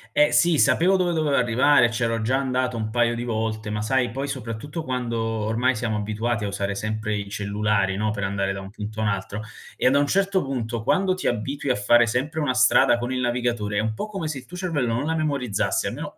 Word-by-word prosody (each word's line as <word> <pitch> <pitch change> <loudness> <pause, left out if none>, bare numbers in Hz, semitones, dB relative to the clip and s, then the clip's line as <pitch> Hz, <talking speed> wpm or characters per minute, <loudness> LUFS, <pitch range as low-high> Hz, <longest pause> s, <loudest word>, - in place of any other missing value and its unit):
Eh, 295 0 +5
sì, 170 -3 +3
sapevo 170 +8 +4
dove 180 -2 +1
dovevo 155 -4 +1
arrivare, 125 +2 +4
e - - -5
c'ero 115 -1 -1
già 130 +4 +1
andato 130 -2 -1
un 110 0 -3
paio 120 0 +2
di 120 - -4
volte, 110 -2 -2
ma 105 0 -2
sai, 125 +1 +1
poi, 135 +4 -3
soprattutto 135 +4 -5
quando 125 -4 -2
ormai 115 +3 0
siamo 110 -1 -2
abituati 110 +2 -2
a 100 - -1
usare 100 0 -2
sempre 110 0 -2
i 100 -1 -4
cellulari, 100 -1 0
no, 105 +1 0
per 105 -1 -4
andare 95 0 -1
da 95 - -6
un 95 - -9
punto 105 +1 -7
a - - 0
un 105 - +2
altro 100 +2 -3 0.3
e - - +1
a - - +7
da 140 - +3
un 145 - +3
certo 195 +3 +1
punto, 120 -4 -3
quando 190 - +2
ti 185 - -7
abitui 130 +4 -1
a - - +2
fare 120 +3 +4
sempre 130 +8 -2
una 130 -3 +1
strada 120 -1 +4
con 120 +1 -3
il 130 0 -1
navigatore, 120 -4 -1
è - - +3
un 110 0 -2
po' - - -3
come 195 -7 -5
se 150 -3 -3
il 125 - -10
tuo 180 - -11
cervello 150 -11 -1
non 130 +5 -1
la 160 - 0
memorizzasse, 140 -9 -1
almeno - - -6
120 Hz, 240 wpm, -24 LUFS, 110-140 Hz, 0.3 s, a